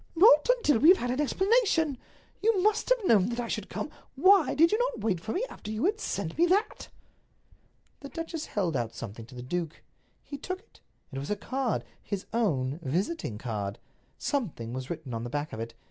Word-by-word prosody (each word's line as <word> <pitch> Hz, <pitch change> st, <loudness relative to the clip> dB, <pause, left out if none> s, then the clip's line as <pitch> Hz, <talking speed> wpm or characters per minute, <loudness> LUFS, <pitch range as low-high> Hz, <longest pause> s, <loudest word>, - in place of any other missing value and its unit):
"Not 430 Hz, +8 st, +7 dB
until 295 Hz, -, +2 dB
we 305 Hz, -, +7 dB
have 370 Hz, -, +8 dB
had 245 Hz, 0 st, -2 dB
an 255 Hz, +4 st, 0 dB
explanation. 365 Hz, -, +2 dB, 0.4 s
You 440 Hz, -2 st, +3 dB
must 430 Hz, +3 st, +2 dB
have -, -, +2 dB
known 210 Hz, -, +4 dB
that 240 Hz, 0 st, -3 dB
I 240 Hz, -, -2 dB
should -, -, -4 dB
come. -, -, -4 dB, 0.2 s
Why 375 Hz, +4 st, +5 dB
did 330 Hz, +2 st, +5 dB
you 430 Hz, -, +2 dB
not -, -, -1 dB
wait 200 Hz, -6 st, 0 dB
for 215 Hz, +6 st, -5 dB
me 425 Hz, -, 0 dB
after 210 Hz, -, -10 dB
you 220 Hz, +6 st, -1 dB
had 425 Hz, +3 st, +1 dB
sent 195 Hz, -, -3 dB
me 345 Hz, -, +5 dB
that?" 405 Hz, +5 st, 0 dB, 1.1 s
The 280 Hz, -, -9 dB
duchess 330 Hz, -1 st, -5 dB
held 185 Hz, -6 st, -1 dB
out 115 Hz, -1 st, -2 dB
something 115 Hz, 0 st, -7 dB
to 130 Hz, -, -13 dB
the 125 Hz, -, -7 dB
duke. 165 Hz, +4 st, -4 dB, 0.4 s
He 285 Hz, -, -8 dB
took 370 Hz, +5 st, -4 dB
it. 450 Hz, -, -25 dB, 0.3 s
It 135 Hz, -, -4 dB
was 140 Hz, -, -6 dB
a 210 Hz, -, +1 dB
card—his 225 Hz, -4 st, -3 dB
own 150 Hz, -, 0 dB
visiting 170 Hz, -, -2 dB
card. 105 Hz, -3 st, -4 dB, 0.4 s
Something 165 Hz, -, -2 dB
was 130 Hz, 0 st, -5 dB
written 155 Hz, -7 st, -5 dB
on 115 Hz, 0 st, -3 dB
the 120 Hz, -, -4 dB
back 145 Hz, +3 st, -3 dB
of 110 Hz, -, -5 dB
it. 115 Hz, 0 st, -6 dB
235 Hz, 205 wpm, -29 LUFS, -, 1.1 s, have